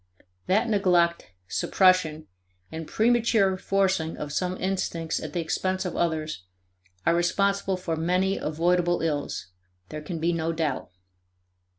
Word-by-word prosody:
That 215 +6 +2
neglect, 180 - +2 0.2
suppression, 185 - +2 0.5
and 160 -1 -6
premature 225 -4 +3
forcing 185 -4 0
of 145 -1 -5
some 180 +3 -1
instincts 175 -3 -2
at - - -7
the 175 - 0
expense 185 +3 -1
of 180 - -3
others, 155 - -1 0.6
are 170 - +4
responsible 195 +2 +1
for 175 -3 -3
many 180 +4 +1
avoidable 175 +2 +1
ills, 145 - -2 0.4
there 155 - -6
can 165 +3 -5
be 170 +2 +1
no 165 0 -1
doubt. 155 -5 -2
175 Hz, 125 wpm, -26 LUFS, 160-190 Hz, 0.6 s, are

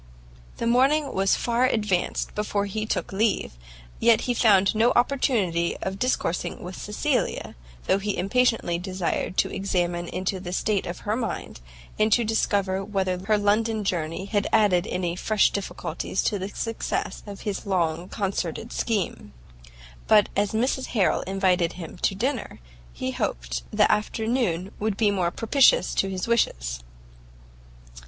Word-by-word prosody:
The - - -3
morning 270 +4 +3
was 195 0 +2
far 240 +1 +1
advanced 210 -7 -1
before 210 -1 -1
he 215 +2 -3
took - - -2
leave, 210 +1 +1 0.5
yet 230 -1 +5
he 245 - 0
found 200 -4 +4
no 225 +2 +4
opportunity 225 -10 +1
of 190 +1 -3
discoursing 180 -8 -1
with 180 +1 -7
Cecilia, 250 +6 -1 0.3
though 195 - +2
he 205 0 -2
impatiently 225 -4 +1
desired 185 0 -2
to - - +1
examine 175 -3 -1
into 185 +2 -2
the 180 -1 -6
state 200 +1 0
of 175 - -6
her 210 +1 -1
mind, 225 - -4 0.4
and 215 +1 +3
to 240 - +4
discover 200 -3 0
whether 190 -3 -1
her 215 +1 +3
London 215 +1 +1
journey 170 -1 -2
had 205 0 0
added 200 -3 +3
any 175 -2 -2
fresh 210 +3 +2
difficulties 200 - -3
to 205 - 0
the 190 +2 -4
success 225 -3 -3
of 200 -1 -8
his 205 -1 -4
long 175 -2 0
concerted 195 +1 -3
scheme. 195 - -2 0.7
But 210 -1 +5
as 200 0 +1
Mrs 255 +4 0
Harrel 195 - +3
invited 185 -3 +1
him 170 -1 -8
to 195 - 0
dinner, 250 +3 -2 0.3
he - - -4
hoped - - -3
the - - +3
afternoon 210 -4 0
would 210 -1 -1
be 210 -3 +3
more 185 -4 +1
propitious 275 - +3
to 195 - +1
his 185 +1 -3
wishes. - - 0
200 Hz, 145 wpm, -25 LUFS, 180-225 Hz, 0.7 s, yet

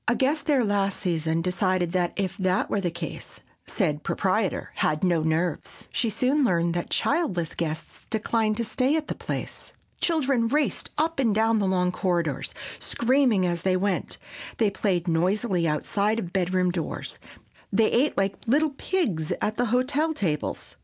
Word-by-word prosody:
A 240 - +3
guest 280 +3 +1
there 280 -5 +4
last 200 -1 0
season 165 -3 0
decided 185 -1 +1
that 180 -1 0
if 190 -2 -2
that 185 -1 0
were 205 - +1
the 180 - 0
case 170 0 -7 0.3
said 150 -8 0
proprietor 195 +2 0
had 155 +2 +1
no 175 -3 +3
nerves. 160 +1 -2
She 230 - +1
soon 255 +7 +1
learned 170 -7 +2
that 175 0 -3
childless 190 - 0
guests 160 -1 -5
declined 220 -1 0
to 235 - 0
stay 255 +5 +1
at 315 -1 -2
the - - 0
place. - - -6 0.3
Children 275 -8 +2
raced 295 +4 0
up 325 +1 0
and 230 -6 +2
down 225 0 +3
the 200 - +1
long 180 -1 +2
corridors, 170 -7 -1 0.2
screaming 240 -6 +2
as 175 -1 -1
they 185 0 +2
went; 195 0 -1 0.4
they 215 -3 +2
played 190 -3 0
noisily 180 +2 +1
outside 200 +8 0
of 180 -6 -4
bedroom 180 -1 +1
doors; 170 -3 -5 0.5
they 215 +2 +3
ate 270 +5 +2
like 195 0 +1
little 295 +5 +3
pigs 270 - -1
at 215 - -1
the 245 - +1
hotel 280 +7 +1
tables. 155 - -3
195 Hz, 165 wpm, -26 LUFS, 175-240 Hz, 0.5 s, there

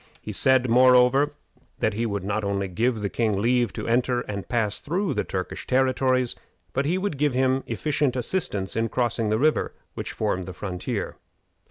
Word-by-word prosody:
He - - -7
said, 130 -1 +3
moreover, 125 +3 +5 0.5
that 110 - 0
he 115 +3 -1
would 100 -3 -3
not 100 +2 -1
only 100 -1 -1
give 115 +5 0
the 100 - 0
king 105 -1 0
leave 120 +2 +2
to - - -5
enter 120 +1 +1
and 100 -4 -6
pass 110 -4 0
through 185 +5 -1
the - - 0
Turkish 95 -1 -5
territories, 130 -1 +2 0.4
but 140 +2 0
he 170 +5 +1
would 190 -7 -3
give 145 -3 +1
him 130 +1 +2
efficient 145 -3 0
assistance 120 - -2
in 115 0 0
crossing 120 -3 0
the 110 - +2
river 155 +5 +1 0.2
which - - -5
formed 90 -1 -2
the 95 - -6
frontier. 90 -1 -4
120 Hz, 180 wpm, -25 LUFS, 105-130 Hz, 0.5 s, moreover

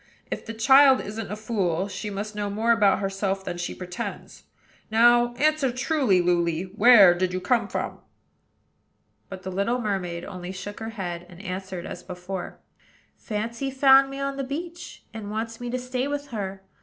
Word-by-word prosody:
If - - -5
the 225 - -5
child 265 +3 +6
isn't 215 +1 -6
a - - -2
fool, 195 -5 -1
she 210 +1 -5
must 205 +2 -5
know 205 -1 -3
more 220 +3 +1
about 210 -4 +4
herself 195 0 -2
than 175 -1 -4
she 175 - -4
pretends. 180 -1 -7 0.4
Now, 240 +2 +4
answer 305 -2 +2
truly, 255 - +2
Luly, 170 -1 +1
where 215 -6 +8
did 180 0 -1
you 185 - -1
come 230 +6 +1
from?" - - -4 1.3
But 190 -1 -8
the 190 - -5
little 200 +7 0
mermaid 185 -6 -3
only 180 0 -7
shook 195 +2 -7
her 220 0 -5
head, 175 -5 -5
and 175 -1 -13
answered 190 -2 -5
as 175 - -7
before, 180 0 -7 0.6
"Fancy 230 +4 -4
found 270 0 +6
me 275 0 -7
on 275 0 -2
the 275 - -2
beach, 335 +6 -7
and 215 -2 -7
wants 225 +2 -4
me 245 - -4
to 250 - -1
stay 250 +1 -2
with 290 0 -4
her. 195 -4 -5
210 Hz, 175 wpm, -25 LUFS, 185-245 Hz, 1.3 s, where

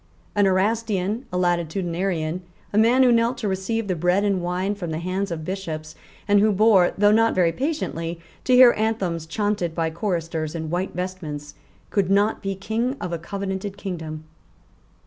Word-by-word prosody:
An 205 -1 +3
Erastian, 210 +2 0
a 180 - -1
latitudinarian, 175 -1 -1 0.3
a - - +1
man 240 +4 +5
who 250 - +5
knelt 235 +1 +2
to 230 -3 -3
receive 200 +3 -2
the 185 - +1
bread 180 +4 +2
and 200 -3 +1
wine 180 +3 -1
from 190 -5 -5
the 155 - -2
hands 185 +4 -2
of 160 -2 -5
bishops, 160 -5 -5 0.3
and 205 0 +5
who 215 +1 +4
bore, 200 -3 +4
though 205 +1 +5
not 225 +1 +3
very 175 -3 +3
patiently, 170 - -3 0.3
to 255 - +4
hear 250 -1 +8
anthems 195 -7 -1
chaunted 205 -3 -1
by 165 -1 0
choristers 165 -3 -2
in 160 -1 -4
white 180 +1 -2
vestments, 160 -5 -5 0.4
could 195 -3 +1
not 205 +2 +2
be 195 0 -2
King 225 +7 -2
of 175 - -4
a 170 - -2
covenanted 195 +2 -4
kingdom. 160 -6 -5
190 Hz, 170 wpm, -23 LUFS, 170-210 Hz, 0.4 s, hear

